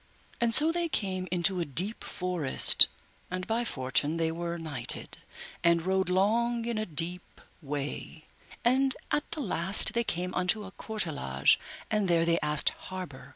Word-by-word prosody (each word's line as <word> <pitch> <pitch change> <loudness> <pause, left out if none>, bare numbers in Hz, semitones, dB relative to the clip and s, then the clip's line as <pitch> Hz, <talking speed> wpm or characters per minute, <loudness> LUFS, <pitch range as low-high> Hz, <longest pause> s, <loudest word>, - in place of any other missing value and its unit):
And 235 -1 +1
so 305 +7 +8
they 340 0 -2
came 185 -7 -2
into 180 +1 +2
a - - 0
deep 180 - +2
forest, 180 -7 +3 0.4
and 185 0 -4
by 230 +2 -1
fortune 145 - 0
they 165 -1 0
were 170 +1 -4
nighted, 145 -8 -3 0.4
and 170 0 +2
rode 190 0 0
long 230 +5 +1
in 235 -2 -2
a 215 - -3
deep 170 +2 -2 0.2
way, 145 +2 -6 0.4
and 265 +2 +3 0.2
at 295 - -1
the 325 -2 -4
last 190 -4 +2
they 235 - +1
came 180 -3 -3
unto 185 +4 0
a 190 - -10
courtelage, 155 - 0 0.3
and 210 -2 +1
there 170 -1 +2
they 170 0 +2
asked 150 -1 +1
harbour. 185 -8 -9
180 Hz, 155 wpm, -28 LUFS, 165-220 Hz, 0.4 s, so